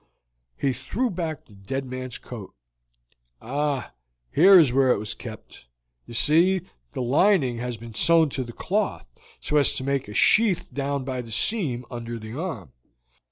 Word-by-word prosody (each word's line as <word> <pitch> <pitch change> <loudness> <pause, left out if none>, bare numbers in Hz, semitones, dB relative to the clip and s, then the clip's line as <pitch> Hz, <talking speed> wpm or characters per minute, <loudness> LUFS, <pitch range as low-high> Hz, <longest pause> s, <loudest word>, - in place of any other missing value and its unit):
He 135 -2 0
threw 210 - -2
back 165 -4 -4
the 105 - -19
dead 100 +8 -5
man's 130 -1 -6
coat. 110 - -10 0.8
"Ah, 140 +1 -2 0.4
here 190 +5 +8
is 140 -7 +4
where 130 -1 +4
it - - +3
was 105 +1 -5
kept. - - -11 0.4
You 120 - -9
see, 170 +10 +3 0.3
the - - -2
lining 135 - +3
has 120 -1 -4
been 115 0 -10
sewn 165 +5 +4
to 130 -1 -3
the 120 - -8
cloth, - - -2 0.3
so 150 - 0
as 145 - +4
to - - -4
make 140 -2 -1
a 105 - -9
sheath 210 -5 +3
down 140 0 -2
by 130 -1 -3
the 115 - -11
seam 125 - -1
under 120 -1 -5
the 110 0 -9
arm. 140 - -5
130 Hz, 165 wpm, -25 LUFS, 120-155 Hz, 0.8 s, here